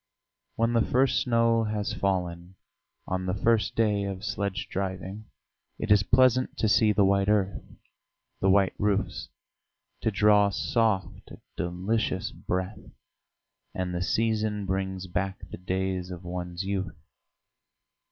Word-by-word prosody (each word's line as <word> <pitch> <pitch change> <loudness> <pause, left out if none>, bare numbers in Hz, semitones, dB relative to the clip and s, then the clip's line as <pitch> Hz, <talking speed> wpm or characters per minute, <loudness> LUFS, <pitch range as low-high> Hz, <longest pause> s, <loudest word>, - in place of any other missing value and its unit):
When 115 +1 +1
the 115 - +4
first 130 +2 +2
snow 115 -2 +2
has 105 -1 -2
fallen, 90 -2 -2 0.5
on 95 0 -3
the 90 - 0
first 115 +2 +1
day 105 -3 +2
of 100 +1 -5
sledge 100 -3 -2
driving 95 +2 -4 0.5
it 110 - -3
is 105 -2 +7
pleasant 130 +4 +3
to 110 - +1
see 110 +1 +4
the 100 -1 +3
white 100 +1 +2
earth, 100 -3 +1 0.8
the 95 - +2
white 95 0 +4
roofs, 105 -1 -1 0.7
to - - +1
draw 105 0 +4
soft, 105 -1 -1 0.3
delicious 95 +2 -1
breath, 95 +3 -3 1.0
and 90 -1 -2
the 90 - -2
season 110 +1 0
brings 95 0 -2
back 95 +2 -3
the - - -6
days 95 0 -2
of 90 0 -8
one's 90 0 -5
youth. 95 -3 -3
100 Hz, 130 wpm, -27 LUFS, 95-110 Hz, 1.0 s, is